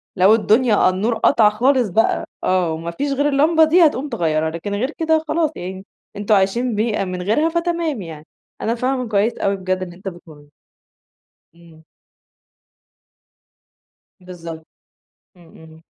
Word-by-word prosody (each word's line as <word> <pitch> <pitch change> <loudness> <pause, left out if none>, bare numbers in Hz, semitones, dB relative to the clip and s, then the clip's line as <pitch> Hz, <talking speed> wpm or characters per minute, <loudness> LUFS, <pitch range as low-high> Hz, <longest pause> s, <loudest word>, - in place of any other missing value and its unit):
لو 190 +3 +5
الدنيا 220 -2 +3
النور 200 +6 -1
قطع 220 -1 +4
خالص 245 +1 +1
بقى 225 +6 +1 0.2
آه، 185 -3 +1
وما 165 +1 -5
فيش 280 +11 -3
غير 285 +2 +1
اللمبة 310 +3 +3
دي، 330 +2 +5
هتقوم 290 -1 0
تغيّرها، 160 - 0
لكن 170 +5 -6
غير 255 +8 -2
كده 320 -1 +1
خلاص 320 -1 0
يعني، 190 +2 -7 0.3
أنتم 205 +1 +1
عايشين 220 +5 0
بيها 215 -2 -1
من 185 -1 -5
غيرها، 225 - +1
فتمام 335 - -2
يعني. 160 -3 -9 0.4
أنا 230 - -1
فاهمة 255 +1 -2
كويس 215 +2 0
أوي 200 0 0
بجد 185 -1 -3
اللي 175 -2 -7
أنت 190 +3 -11
بتقوله. 160 -5 -11 1.1
إمم. 165 -2 -19 2.4
بالضبط 170 -3 -10 0.7
إمم، 175 - -19
إمم. 160 0 -16
205 Hz, 145 wpm, -19 LUFS, 175-260 Hz, 2.4 s, لو